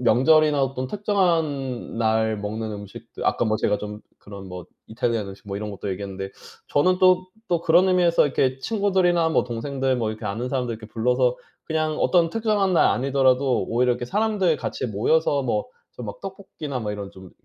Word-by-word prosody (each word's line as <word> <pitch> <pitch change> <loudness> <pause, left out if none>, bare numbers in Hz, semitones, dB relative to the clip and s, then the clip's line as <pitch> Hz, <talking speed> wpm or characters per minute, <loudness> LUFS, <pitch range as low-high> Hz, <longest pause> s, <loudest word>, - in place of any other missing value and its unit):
명절이나 140 +5 +4
어떤 130 -1 -2
특정한 160 - -1
날 110 -1 +1
먹는 110 +2 -4
음식들 100 -1 -8
아까 - - +2
뭐 110 -1 +1
제가 105 -1 +1
좀 105 0 -7 0.2
그런 100 -1 -10
뭐 90 -1 -8 0.2
이탈리안 110 -2 -2
음식 100 +1 -12
뭐 100 - -4
이런 105 0 -5
것도 100 0 -5
얘기했는데 95 0 -5 0.4
저는 180 +6 +2
또, 185 0 +4 0.2
또 170 -2 +1
그런 170 +3 +4
의미에서 175 -3 +4
이렇게 130 -1 +1
친구들이나 185 -3 +2
뭐 160 - +2
동생들 130 +2 -2
뭐 115 -2 -1
이렇게 110 - -8
아는 115 +5 -3
사람들 125 -2 -1
이렇게 110 0 -10
불러서 125 +2 +1 0.3
그냥 155 -1 -1
어떤 170 -2 +3
특정한 210 -2 +1
날 - - +5
아니더라도 130 -1 +2
오히려 125 +2 +2
이렇게 120 0 -4
사람들 200 - +1
같이 - - -4
모여서 140 +7 +1
뭐 110 -4 -1 0.3
저 - - -7
막 105 - -7
떡볶이나 160 -8 -6
뭐 105 -2 -3
이런 100 -1 -6
좀 95 -1 -13
130 Hz, 395 characters per minute, -23 LUFS, 110-165 Hz, 0.4 s, 날